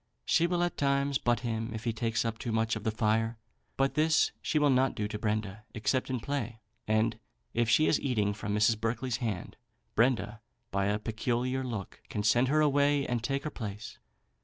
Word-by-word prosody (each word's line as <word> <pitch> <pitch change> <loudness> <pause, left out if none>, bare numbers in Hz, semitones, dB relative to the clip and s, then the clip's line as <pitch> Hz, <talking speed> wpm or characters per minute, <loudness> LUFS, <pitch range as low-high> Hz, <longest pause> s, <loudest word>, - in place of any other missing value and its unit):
She 170 +1 +3
will 175 0 +1
at 175 - -1
times 140 0 +1
butt 120 -1 +1
him 115 -1 -3
if 110 - -6
he 115 - 0
takes 115 +1 -1
up 115 -1 -2
too 120 - -3
much 110 0 +1
of 110 - -5
the 110 - +1
fire; 110 +1 +1 0.4
but 135 0 +2
this 155 +1 +3
she - - 0
will 145 -2 +4
not 130 +1 +3
do 105 - -1
to 105 0 -5
Brenda, 105 -1 -2
except 130 +5 0
in 130 -1 -1
play; 120 -3 -3 0.3
and 110 +1 +1 0.3
if 120 -1 +1
she 140 +7 +5
is 155 - +3
eating 105 -6 +1
from 105 0 -3
Mrs. 105 +1 +3
Berkeley's 115 +2 -1
hand, 110 -8 -4 0.4
Brenda 115 -2 +1 0.3
by 100 0 +1
a 105 +1 +1
peculiar 120 +4 -1
look 110 -7 -5
can 105 - -2
send 120 +5 +4
her 155 +3 +3
away 145 -1 +3
and 120 -2 -2
take 135 +3 -1
her 155 - -3
place. 105 -4 -7
115 Hz, 200 wpm, -30 LUFS, 110-135 Hz, 0.4 s, she